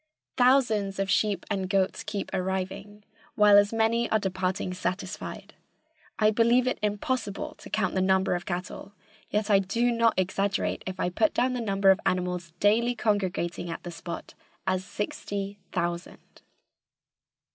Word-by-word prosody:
Thousands 235 Hz, -6 st, +3 dB
of 195 Hz, 0 st, -1 dB
sheep 205 Hz, -4 st, +1 dB
and 190 Hz, -3 st, -2 dB
goats 190 Hz, -1 st, +1 dB
keep 205 Hz, -1 st, -4 dB
arriving, 190 Hz, +2 st, -3 dB, 0.3 s
while 210 Hz, -1 st, +6 dB
as 205 Hz, 0 st, +6 dB
many 225 Hz, +1 st, +1 dB
are 220 Hz, -, +3 dB
departing 185 Hz, -2 st, -2 dB
satisfied. 185 Hz, +1 st, -5 dB, 0.6 s
I 215 Hz, -1 st, +4 dB
believe 235 Hz, +3 st, +3 dB
it 255 Hz, -, -1 dB
impossible 210 Hz, 0 st, -2 dB
to -, -, -11 dB
count 210 Hz, -3 st, 0 dB
the 185 Hz, -, +1 dB
number 190 Hz, 0 st, +2 dB
of 175 Hz, 0 st, -3 dB
cattle, 185 Hz, +2 st, -5 dB, 0.4 s
yet 210 Hz, 0 st, 0 dB
I 200 Hz, -, +6 dB
do 230 Hz, +6 st, +1 dB
not 230 Hz, -1 st, +3 dB
exaggerate 195 Hz, +2 st, 0 dB
if 185 Hz, 0 st, -5 dB
I -, -, +1 dB
put 310 Hz, -, +1 dB
down 250 Hz, +1 st, +2 dB
the 250 Hz, -, -2 dB
number 195 Hz, -3 st, +4 dB
of 190 Hz, -, +2 dB
the -, -, -3 dB
animals 180 Hz, -2 st, -1 dB
daily 235 Hz, +4 st, +3 dB
congregating 185 Hz, -6 st, -1 dB
at 165 Hz, -, -6 dB
the 175 Hz, -, -6 dB
spot 170 Hz, +1 st, -7 dB, 0.3 s
as 185 Hz, -1 st, 0 dB
sixty 200 Hz, 0 st, -4 dB
thousand. 175 Hz, 0 st, -4 dB
200 Hz, 155 wpm, -27 LUFS, 185-215 Hz, 0.6 s, while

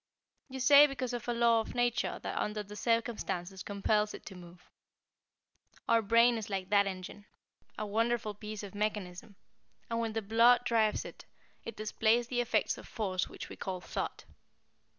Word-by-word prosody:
You 265 Hz, 0 st, -6 dB
say 285 Hz, +2 st, +8 dB
because 255 Hz, -3 st, -4 dB
of 240 Hz, -1 st, -5 dB
a -, -, +1 dB
law 235 Hz, -1 st, +3 dB
of 220 Hz, -, -5 dB
nature 245 Hz, 0 st, 0 dB
that -, -, -4 dB
under 210 Hz, 0 st, -2 dB
the 205 Hz, +1 st, -11 dB
circumstances 210 Hz, -5 st, -2 dB
compels 210 Hz, +1 st, 0 dB
it -, -, -12 dB
to 195 Hz, -, -9 dB
move. 175 Hz, 0 st, -14 dB, 1.2 s
Our 230 Hz, 0 st, +4 dB
brain 230 Hz, +2 st, +4 dB
is 215 Hz, -, -7 dB
like 190 Hz, -2 st, -3 dB
that 200 Hz, -1 st, +4 dB
engine 190 Hz, +2 st, -7 dB, 0.5 s
a 215 Hz, -, -3 dB
wonderful 225 Hz, +1 st, 0 dB
piece 210 Hz, 0 st, -7 dB
of 200 Hz, -, -8 dB
mechanism, 205 Hz, -1 st, -4 dB, 0.6 s
and 230 Hz, -, 0 dB
when 225 Hz, -1 st, -2 dB
the 225 Hz, 0 st, -2 dB
blood 235 Hz, +4 st, +5 dB
drives 220 Hz, -3 st, +1 dB
it, -, -, -11 dB, 0.4 s
it 230 Hz, -, -6 dB
displays 225 Hz, +2 st, +1 dB
the 245 Hz, -1 st, +1 dB
effects 240 Hz, -, 0 dB
of -, -, -12 dB
force 190 Hz, -5 st, -2 dB
which -, -, -8 dB
we -, -, -9 dB
call 185 Hz, -1 st, -4 dB
Thought. -, -, -5 dB
215 Hz, 170 wpm, -31 LUFS, 200-235 Hz, 1.2 s, say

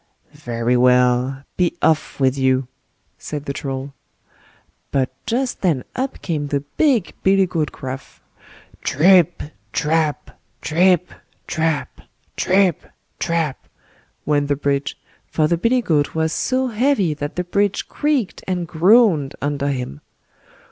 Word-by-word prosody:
"Very 120 Hz, +1 st, -1 dB
well! 125 Hz, +2 st, +3 dB
be 180 Hz, -1 st, +1 dB
off 160 Hz, -3 st, +1 dB
with 135 Hz, -1 st, +3 dB
you", 130 Hz, -1 st, +1 dB, 0.5 s
said 150 Hz, -1 st, -6 dB
the 140 Hz, -, -3 dB
Troll. 135 Hz, 0 st, -5 dB, 1.0 s
But 135 Hz, -2 st, 0 dB, 0.2 s
just 250 Hz, +2 st, -1 dB
then 160 Hz, -9 st, +1 dB
up 260 Hz, +1 st, -3 dB
came 150 Hz, -5 st, -2 dB
the 140 Hz, -1 st, -1 dB
big 225 Hz, -, +1 dB
billy 195 Hz, 0 st, +4 dB
goat 165 Hz, -4 st, -2 dB
Gruff. 130 Hz, 0 st, -8 dB, 0.6 s
"TRIP, 175 Hz, +3 st, +4 dB, 0.3 s
TRAP! 155 Hz, -1 st, 0 dB, 0.3 s
TRIP, 180 Hz, +2 st, +2 dB, 0.3 s
TRAP! 160 Hz, -2 st, -2 dB, 0.3 s
TRIP, 190 Hz, -1 st, +2 dB, 0.4 s
TRAP!" 165 Hz, -5 st, -2 dB, 0.6 s
went 145 Hz, -1 st, +1 dB
the 145 Hz, -, +1 dB
bridge, 140 Hz, 0 st, -1 dB, 0.3 s
for 155 Hz, -1 st, +1 dB
the 170 Hz, -, +2 dB
billy 235 Hz, +8 st, +1 dB
goat 150 Hz, -6 st, +1 dB
was 160 Hz, 0 st, 0 dB
so 260 Hz, 0 st, 0 dB
heavy 225 Hz, -, +1 dB
that 145 Hz, 0 st, -5 dB
the 180 Hz, -, -1 dB
bridge 200 Hz, +2 st, 0 dB
creaked 290 Hz, -9 st, -1 dB
and 180 Hz, -2 st, -2 dB
groaned 170 Hz, -, +4 dB
under 145 Hz, 0 st, -1 dB
him. 125 Hz, -, -3 dB
155 Hz, 125 wpm, -20 LUFS, 140-185 Hz, 1.0 s, billy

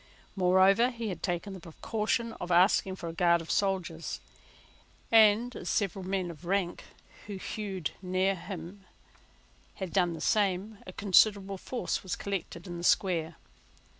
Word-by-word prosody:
Moreover 190 Hz, +5 st, +5 dB
he 230 Hz, -3 st, -4 dB
had 185 Hz, -, -5 dB
taken 180 Hz, +2 st, -2 dB
the 190 Hz, -, -8 dB
precaution 220 Hz, +7 st, -2 dB
of 180 Hz, -, -4 dB
asking 185 Hz, +2 st, +4 dB
for 170 Hz, -, -7 dB
a 165 Hz, -, -5 dB
guard 170 Hz, 0 st, +3 dB
of 165 Hz, -, -6 dB
soldiers; 185 Hz, -5 st, -1 dB, 0.9 s
and, 225 Hz, +2 st, +5 dB
as 175 Hz, -, -5 dB
several 195 Hz, -2 st, -1 dB
men 185 Hz, -1 st, -2 dB
of 160 Hz, 0 st, -14 dB
rank, 185 Hz, 0 st, -1 dB, 0.4 s
who 205 Hz, -, -5 dB
hued 190 Hz, -3 st, -4 dB
near 185 Hz, +1 st, +1 dB
him, 185 Hz, +1 st, -8 dB, 0.9 s
had 190 Hz, -3 st, -6 dB
done 180 Hz, -3 st, +2 dB
the 165 Hz, -, -7 dB
same, 200 Hz, 0 st, 0 dB
a -, -, -6 dB
considerable 200 Hz, 0 st, +3 dB
force 250 Hz, +4 st, -3 dB
was 190 Hz, -, -3 dB
collected 190 Hz, -3 st, -5 dB
in 175 Hz, -2 st, -6 dB
the -, -, -7 dB
Square. 170 Hz, -3 st, +2 dB
190 Hz, 150 wpm, -30 LUFS, 175-205 Hz, 0.9 s, Moreover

